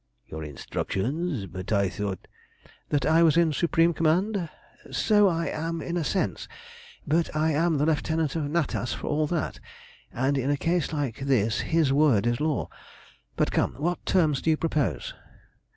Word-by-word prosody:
"Your 80 0 -7
instructions! 120 - -3
But 95 +2 -7
I 100 -2 +3
thought" 95 0 -5 0.6
"That 140 -3 +1
I 160 +1 +4
was 165 -1 +5
in 165 -2 +3
supreme 170 +2 +2
command. 175 +3 +1 0.4
So 210 -2 +3
I 165 -2 0
am 165 +1 -3
in 170 +2 -4
a 175 - 0
sense, 190 +5 -1 0.6
but 160 +1 0
I 155 +1 +2
am 160 +1 +2
the 145 - +2
lieutenant 160 -1 0
of 160 -3 -1
Natas 150 -6 -1
for - - -7
all 150 +1 0
that, 165 -1 -2 0.5
and 135 +3 0
in 135 +2 -1
a 145 - +2
case 170 0 0
like 140 -7 -2
this 125 -6 +1
his 160 -5 +1
word 140 -8 +3
is 120 +2 0
law. 155 -2 0 0.7
But - - +1
come, - - 0
what 175 +5 -2
terms 155 -7 +2
do - - 0
you 155 - +3
propose?" 155 -4 -1
155 Hz, 170 wpm, -26 LUFS, 135-165 Hz, 0.7 s, was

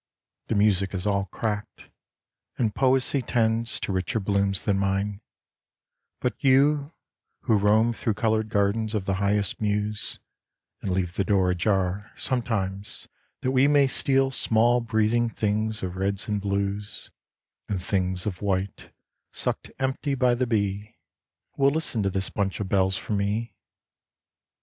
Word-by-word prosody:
The - - -1
music 100 -2 +2
is 90 +1 -3
all 100 -1 +1
cracked, 105 +2 -5 0.7
and 110 -4 0
Poesy 135 +1 +2
tends 115 -1 +1
To - - -2
richer 95 +4 -1
blooms 100 -3 +2
than 100 -1 +1
mine; 100 +1 -1 1.0
but 125 -4 -3
you 140 +2 +4 0.5
who 110 - +2
roam 110 +3 +3
Thro' 110 -2 -2
coloured 110 0 0
gardens 105 +2 0
of 100 -3 -1
the 95 - 0
highest 100 0 +1
muse, 105 0 -2 0.6
And - - -3
leave 90 -2 -1
the 100 - +2
door 95 -1 +2
ajar 95 +1 0
sometimes 105 -6 -2 0.3
that 130 - 0
we 130 +1 +4
May 145 -1 +5
steal 135 0 +2
small 120 -1 +3
breathing 115 +1 +1
things 110 0 -1
of 90 -1 -3
reds 100 +1 -1
and 105 -2 -1
blues 100 +1 -3 0.6
And 100 -3 -1
things 90 -1 -1
of 95 -4 -4
white 95 -1 -2 0.4
sucked - - -3
empty 135 +2 -1
by 125 -2 +3
the 125 +1 0
bee, 105 -2 -2 0.6
Will 140 0 +5
listen 140 -6 -1
to 100 - +1
this 95 0 -2
bunch 100 -2 -2
of 100 - -3
bells 95 -1 +2
from 105 - -3
me. 105 +4 -1
105 Hz, 145 wpm, -25 LUFS, 100-115 Hz, 1.0 s, May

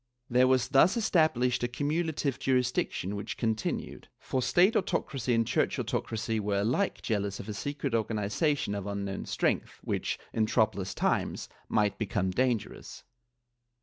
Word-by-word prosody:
^ - - -50 0.3
There 125 +1 +5
was 130 -1 +2
thus 145 - +5
established 155 - +2
a 120 - +1
cumulative 145 +1 -1
jurisdiction 125 -6 0
which 100 - -5
continued, 110 -2 -2
for 130 - -2
State 185 - +4
autocracy 135 - 0
and 115 0 +2
Church - - +1
autocracy 110 0 -2
were 100 -1 0
alike 130 - 0
jealous 100 -3 -1
of - - -7
a 105 - -4
secret 140 +3 -3
organization 110 +4 0
of 100 -1 -4
unknown 100 -1 -3
strength - - -1
which, - - -2 0.2
in 110 -1 +1
troublous 110 -4 +1
times, - - -1 0.2
might 105 -2 +1
become 95 -3 0
dangerous. 120 +1 -2
120 Hz, 145 wpm, -29 LUFS, 105-135 Hz, 0.3 s, There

